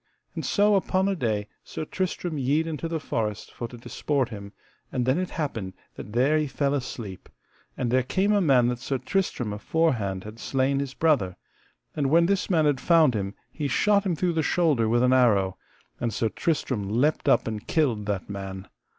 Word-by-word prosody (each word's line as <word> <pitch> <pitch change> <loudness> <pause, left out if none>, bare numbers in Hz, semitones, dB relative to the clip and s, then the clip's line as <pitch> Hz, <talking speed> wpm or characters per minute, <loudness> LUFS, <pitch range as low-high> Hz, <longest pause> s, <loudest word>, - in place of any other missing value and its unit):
And - - -4
so 205 0 +3
upon 190 -1 +2
a 200 - +1
day 110 - -1 0.2
Sir 155 - -6
Tristram 180 -1 -3
yede 145 +5 +1
into 165 0 -3
the 165 -1 -2
forest 110 -7 -3
for 120 - -5
to 120 - -11
disport 135 +2 -1
him, 100 -3 -8 0.4
and 125 -1 -1
then 130 +6 +2
it 185 - -2
happened 115 - -4 0.2
that 105 - -9
there 135 +6 +3
he 155 - 0
fell 140 0 0
sleep; 105 -7 -8 0.5
and 120 -2 -1
there 130 +1 +4
came 190 +11 +1
a 205 - +3
man 130 -8 +4
that 125 -1 -3
Sir 135 +1 -2
Tristram 130 - -1
aforehand 105 - 0
had 110 +2 -10
slain 135 +2 0
his 140 -1 -4
brother, 135 - +2 0.6
and 140 -3 0
when 170 +3 +5
this 195 +1 0
man 160 -5 +3
had 145 -3 +1
found 160 -6 +5
him 100 -2 -3 0.2
he 150 -2 -3
shot 205 +6 +3
him 185 -4 0
through 175 +2 0
the 160 - +1
shoulder 150 -9 +2
with 120 +2 +3
an 125 0 +4
arrow, 100 -7 +3 0.4
and 120 - -1
Sir 110 +1 0
Tristram 130 -9 -1
leapt 140 +7 +1
up 135 - +3
and 110 -2 -5
killed 125 - +1
that 100 -3 -2
man. 95 -1 -6
130 Hz, 195 wpm, -26 LUFS, 110-160 Hz, 0.6 s, when